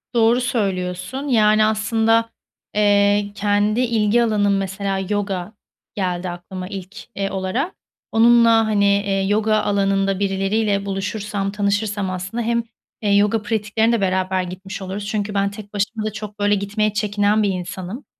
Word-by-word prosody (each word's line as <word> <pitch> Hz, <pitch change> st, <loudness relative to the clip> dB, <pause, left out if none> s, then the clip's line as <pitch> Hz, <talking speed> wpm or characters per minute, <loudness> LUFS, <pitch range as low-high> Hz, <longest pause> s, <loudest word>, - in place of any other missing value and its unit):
Doğru 235 Hz, +2 st, +4 dB
söylüyorsun. 195 Hz, +2 st, -2 dB
Yani, 215 Hz, -4 st, +4 dB
aslında, 225 Hz, +1 st, +2 dB, 0.5 s
eee, 205 Hz, 0 st, +3 dB
kendi 205 Hz, +2 st, +1 dB
ilgi 230 Hz, -1 st, +2 dB
alanım, 205 Hz, -3 st, +2 dB
mesela, 195 Hz, 0 st, -2 dB
yoga 200 Hz, -2 st, -2 dB, 0.4 s
geldi 180 Hz, -2 st, -2 dB
aklıma 180 Hz, +1 st, -7 dB
ilk, 195 Hz, 0 st, -8 dB, 0.2 s
eee, 195 Hz, -1 st, -2 dB
olarak. 195 Hz, -, -2 dB, 0.4 s
Onunla, 230 Hz, 0 st, +5 dB
hani, 205 Hz, -2 st, +2 dB
eee, 200 Hz, -1 st, +2 dB
yoga 215 Hz, +1 st, +2 dB
alanında 195 Hz, -1 st, +1 dB
birileriyle 200 Hz, +1 st, 0 dB
buluşursam, 200 Hz, 0 st, -3 dB
tanışırsam 205 Hz, -1 st, -1 dB
aslında 185 Hz, +6 st, -4 dB
hem, 235 Hz, +1 st, 0 dB, 0.4 s
eee, 205 Hz, -2 st, +2 dB
yoga 210 Hz, +2 st, +3 dB
pratiklerine 220 Hz, +1 st, 0 dB
de 230 Hz, -3 st, +1 dB
beraber 185 Hz, -1 st, 0 dB
gitmiş 190 Hz, +2 st, -7 dB
oluruz. 195 Hz, +2 st, -5 dB
Çünkü 210 Hz, -1 st, -2 dB
ben 200 Hz, 0 st, +1 dB
tek 205 Hz, 0 st, -11 dB
başıma 215 Hz, +2 st, -2 dB
da 215 Hz, -, -1 dB
çok, 210 Hz, 0 st, -8 dB
böyle, 205 Hz, 0 st, +3 dB
gitmeye 210 Hz, +1 st, -1 dB
çekinen 210 Hz, 0 st, +1 dB
bir 200 Hz, -, +2 dB
insanım. 185 Hz, +6 st, -5 dB
205 Hz, 140 wpm, -21 LUFS, 195-215 Hz, 0.5 s, Onunla